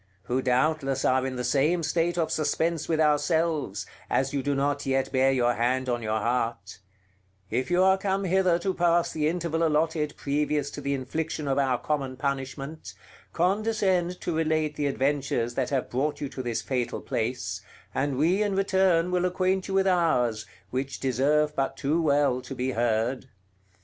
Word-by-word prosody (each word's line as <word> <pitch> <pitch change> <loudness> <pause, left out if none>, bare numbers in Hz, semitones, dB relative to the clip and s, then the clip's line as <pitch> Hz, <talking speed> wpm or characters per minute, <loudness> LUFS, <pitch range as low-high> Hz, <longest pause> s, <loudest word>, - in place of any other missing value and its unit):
who 125 +5 -1
doubtless 135 +1 +1
are 130 0 +2
in 130 - -4
the 125 - -3
same 150 +7 +2
state 170 +2 0
of 160 -2 0
suspense 160 +1 0
with 160 -1 +1
ourselves, 150 - +1 0.2
as 135 +2 0
you 140 - 0
do 140 +1 -1
not 140 +1 0
yet 135 0 0
bear 135 0 +3
your 120 -2 +2
hand 130 +2 0
on 120 -1 -1
your 110 -1 -1
heart, 115 -3 -2 0.7
if 125 +6 -1
you 180 +1 +3
are 190 0 +4
come 195 0 -1
hither 185 -1 +3
to 190 +2 -1
pass 170 -1 +2
the 150 -1 0
interval 165 -1 -1
allotted 155 -1 +1
previous 145 0 -1
to - - -7
the 140 0 -1
infliction 150 +3 -3
of 135 0 +1
our 130 -3 +2
common 135 -2 -2
punishment, 140 +2 -4 0.4
condescend 185 -1 +1
to 170 - -3
relate 155 -1 0
the 145 -1 -1
adventures 135 -4 0
that 130 0 -1
have 135 -3 -1
brought 140 +4 -1
you 145 - -3
to 130 -1 -6
this 120 -2 -3
fatal 125 -3 -2
place, 100 -5 -3 0.3
and 135 -1 -1
we 175 +8 +2
in 205 -2 0
return 190 -3 +2
will 180 0 +1
acquaint 185 +1 0
you 195 - -2
with 195 0 +3
ours, 125 - +1 0.2
which 130 +1 -3
deserve 145 +4 +1
but 135 -1 -1
too 155 +5 +1
well 140 -4 +2
to 135 - -8
be 130 +1 -1
heard. 120 +2 0
145 Hz, 175 wpm, -27 LUFS, 130-165 Hz, 0.7 s, are